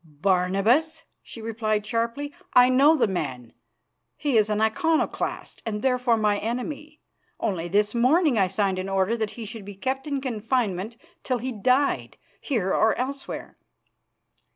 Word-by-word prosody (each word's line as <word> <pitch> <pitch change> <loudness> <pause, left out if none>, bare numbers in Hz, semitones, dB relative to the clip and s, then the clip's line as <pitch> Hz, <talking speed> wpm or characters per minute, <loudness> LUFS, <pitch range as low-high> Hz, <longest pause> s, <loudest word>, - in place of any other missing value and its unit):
"Barnabas," 195 - +1 0.2
she 230 - -11
replied 215 -2 -1
sharply. 235 +6 -2 0.2
"I 250 0 +7
know 280 +5 +5
the 260 - +3
man. 130 - -4 0.6
He 285 -5 -1
is 215 -1 +4
an 210 0 0
Iconoclast, 265 +9 -1
and 210 -2 -4
therefore 250 -3 +2
my 210 -2 +1
enemy. 290 +7 -5 0.4
Only 180 -6 -2
this 205 +3 +2
morning 270 +5 +3
I 195 -3 +3
signed 190 0 0
an 190 +1 -4
order 195 +3 +1
that 220 -2 -2
he 230 - -6
should 215 0 -8
be 200 0 -9
kept 265 +8 -3
in 280 -2 -1
confinement 225 -4 -2 0.2
till 255 -2 -1
he 255 +3 -4
died, 255 +5 +1 0.2
here 210 -9 -1
or 220 - +3
elsewhere. 275 +2 -5
225 Hz, 150 wpm, -25 LUFS, 200-260 Hz, 0.6 s, I